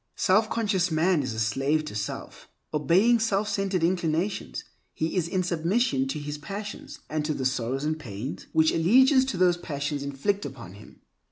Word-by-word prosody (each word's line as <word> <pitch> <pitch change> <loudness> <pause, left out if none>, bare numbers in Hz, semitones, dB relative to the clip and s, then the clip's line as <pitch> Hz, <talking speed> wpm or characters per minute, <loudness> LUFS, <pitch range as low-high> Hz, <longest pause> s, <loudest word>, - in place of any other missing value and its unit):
Self 215 +4 +3
conscious 200 -5 +1
man 165 +1 +2
is 130 -4 -4
a - - -3
slave 135 +8 +1
to 150 - -7
self. 105 -1 -6 0.3
Obeying 185 - +4
self 210 -2 +1
centered 195 -4 -1
inclinations, 175 +2 -1 0.3
he 160 +3 -2
is 175 -3 +1
in 185 +1 0
submission 170 - +1
to 135 - -3
his 145 0 -5
passions, 205 +6 -7
and 155 -1 -2
to 150 0 -1
the 130 - -3
sorrows 130 +1 -1
and 155 +1 -1
pains 115 +1 -6
which 160 0 +4
allegiance 260 - +5
to 260 -8 -3
those 180 -1 +4
passions 145 -3 -3
inflict 140 +9 -1
upon 115 -8 -8
him. 105 +2 -15
160 Hz, 175 wpm, -26 LUFS, 140-195 Hz, 0.3 s, allegiance